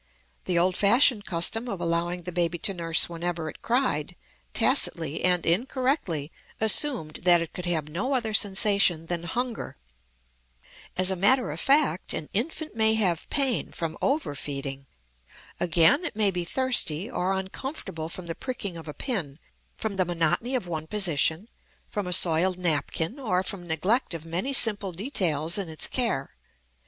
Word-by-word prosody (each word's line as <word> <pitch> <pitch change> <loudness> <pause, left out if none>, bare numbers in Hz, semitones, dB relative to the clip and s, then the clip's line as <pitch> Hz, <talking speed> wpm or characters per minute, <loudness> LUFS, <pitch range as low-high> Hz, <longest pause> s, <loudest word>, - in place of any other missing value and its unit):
The 180 -2 0
old 180 +2 +2
fashioned 215 +2 +4
custom 190 +7 +1
of 195 - -4
allowing 170 +1 -2
the 180 - -6
baby 175 -1 -1
to 195 +4 +1
nurse 165 -2 +2
whenever 170 -1 -4
it - - -12
cried, 230 - -1 0.4
tacitly 160 - +2
and 180 -1 +3
incorrectly 205 - 0 0.3
assumed 220 - +3
that 175 -1 +5
it 165 -1 -5
could 180 0 -6
have 160 -4 -1
no 200 - -2
other 225 -4 -1
sensation 200 -4 +3
than 170 0 -3
hunger. 240 +6 -4 1.2
As 185 +1 +4
a - - 0
matter 235 - +3
of 155 - -6
fact 275 - +2
an 150 - -6
infant 305 +6 -3
may 220 0 +4
have 185 -7 -1
pain 270 -4 0
from 165 -1 -5
overfeeding. 140 - -3 0.7
Again, 175 - +4
it 335 - -4
may 210 -2 +3
be 175 -2 -3
thirsty, 200 - 0
or 185 -4 -1
uncomfortable 190 - -5
from 180 +1 -5
the 165 - -4
pricking 205 -6 -5
of 160 - -10
a 150 - -7
pin, 175 - -3 0.4
from 210 -3 -4
the 185 - +2
monotony 175 +9 0
of 245 - -2
one 160 -2 -5
position, 170 -1 +1 0.4
from 205 -4 -4
a 180 - +1
soiled 180 +1 +3
napkin, 170 - -1
or 185 -8 0
from 185 -2 -6
neglect 185 - 0
of 165 -1 -8
many 175 +11 -3
simple 210 -7 +1
details 175 - 0
in 190 -4 -3
its 155 - 0
care. 230 - -1
180 Hz, 160 wpm, -26 LUFS, 165-225 Hz, 1.2 s, that